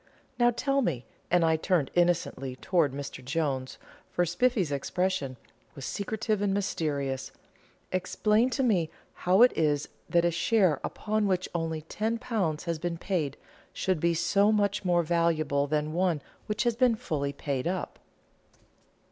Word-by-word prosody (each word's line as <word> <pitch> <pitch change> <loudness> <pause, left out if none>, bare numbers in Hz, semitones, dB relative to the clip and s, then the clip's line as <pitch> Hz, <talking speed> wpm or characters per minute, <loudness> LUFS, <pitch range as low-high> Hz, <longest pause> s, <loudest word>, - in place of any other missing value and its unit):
"Now 240 0 +6
tell 275 +3 +1
me," 145 - -1 0.2
and 175 -1 +4
I 160 -1 +3
turned 160 -4 +1
innocently 170 -7 +1
towards 155 -2 +1
Mr 140 -2 -6
Jones, 135 -2 -2 0.3
for 175 - +1
Spiffy's 190 - +1
expression 145 -1 -1 0.4
was 135 - -7
secretive 215 - -2
and 200 -1 +1
mysterious 145 -9 -2 0.6
"explain 210 +6 +2
to 270 +1 -1
me 185 -10 +2 0.2
how 185 +6 +4
it 250 - +5
is 150 -2 +1 0.2
that 170 0 +3
a 175 - +3
share 170 -3 +2
upon 215 -1 -1
which 185 -1 0
only 160 -2 -2
£10 215 -4 -2
has 170 -2 -2
been 170 0 -2
paid, 160 -6 -2 0.4
should 185 -4 0
be 170 +1 +2
so 200 +5 +3
much 205 -2 +1
more 175 -2 +3
valuable 155 -4 +1
than 150 +1 -1
one 175 -4 +1 0.2
which 210 +2 0
has 240 -2 +1
been 245 -1 +4
fully 140 -9 -2
paid 140 0 -3
up." 180 0 -3
175 Hz, 150 wpm, -28 LUFS, 150-205 Hz, 0.6 s, Now